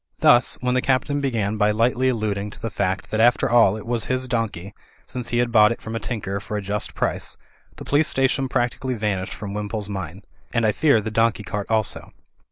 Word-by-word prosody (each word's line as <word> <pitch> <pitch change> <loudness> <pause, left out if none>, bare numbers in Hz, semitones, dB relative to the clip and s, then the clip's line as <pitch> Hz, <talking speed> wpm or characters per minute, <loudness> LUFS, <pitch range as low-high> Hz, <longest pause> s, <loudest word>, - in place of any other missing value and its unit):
Thus, 120 - +4
when 125 0 0
the 130 - +2
Captain 135 +2 0
began 110 -6 -1
by 105 0 +3
lightly 120 +4 +2
alluding 105 -4 -2
to - - -12
the 115 - -4
fact 95 -2 -2
that 110 - -1
after 120 +2 +4
all 115 -4 +4
it 110 - -9
was 120 -1 -1
his 130 0 -1
donkey, 105 -6 -3 0.3
since 125 -2 -5
he 120 - 0
had 120 -1 +1
bought 105 -1 +6
it 115 - -3
from 110 0 -6
a - - -1
tinker 100 -5 -3
for 105 +1 -5
a - - -2
just 105 +1 -2
price, - - -2 0.4
the - - -10
police 150 +2 +2
station 135 0 +1
practically 125 0 -1
vanished 100 -4 -2
from 100 -1 -6
Wimpole's 105 0 -4
mind 95 -1 -6
— - - -27
and 115 -1 +2
I 110 - +4
fear 140 -1 +3
the 110 +1 -4
donkey 115 -1 +1
cart 105 -1 -4
also. 110 -2 -1
110 Hz, 220 wpm, -23 LUFS, 105-120 Hz, 0.4 s, bought